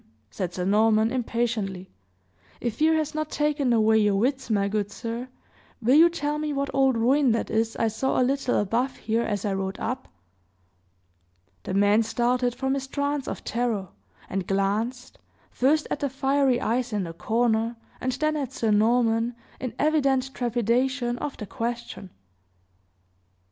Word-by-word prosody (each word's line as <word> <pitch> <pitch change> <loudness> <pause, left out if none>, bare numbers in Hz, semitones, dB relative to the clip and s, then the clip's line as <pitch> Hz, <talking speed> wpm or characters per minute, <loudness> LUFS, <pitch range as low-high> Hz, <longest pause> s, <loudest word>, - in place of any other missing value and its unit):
said 175 +11 -3
Sir 180 0 -3
Norman, 215 +2 +3
impatiently. 225 -7 -2 0.7
"If 235 -2 -3
fear 320 +1 +4
has 310 -1 -1
not 310 0 -2
taken 295 -3 0
away 220 -1 +4
your 205 -2 +3
wits, 260 +5 0
my 200 -2 +2
good 205 0 -1
sir, 230 +3 -5 0.5
will 240 +2 +2
you 325 +4 +7
tell 300 -3 -2
me 305 -1 -2
what 280 0 -2
old 270 -2 +3
ruin 255 +2 +3
that 230 - -2
is 225 0 0
I 225 - +1
saw 225 +5 0
a - - +4
little 270 -1 0
above 235 +6 0
here 225 +1 0
as 205 -3 -2
I 200 - 0
rode 190 0 -3
up?" 255 +3 -3 1.5
The 185 - -4
man 205 +2 +4
started 240 +2 0
from 265 +1 -1
his 270 -1 -3
trance 285 0 -2
of - - -5
terror, 225 -6 -1 0.4
and 190 -1 -3
glanced, 215 +6 -1 0.3
first 300 +4 +2
at - - -1
the 285 - -1
fiery 270 -1 +2
eyes 245 +2 -1
in 205 -2 0
the 165 -2 -6
corner, 225 +4 0 0.3
and 255 - 0
then 310 +3 0
at 275 -4 -3
Sir 225 -4 0
Norman, 230 +2 +2 0.2
in 255 -2 -5
evident 275 -4 +1
trepidation 240 +1 0
of 290 - -4
the 210 - -6
question. 235 -3 -5
240 Hz, 160 wpm, -25 LUFS, 220-270 Hz, 1.5 s, you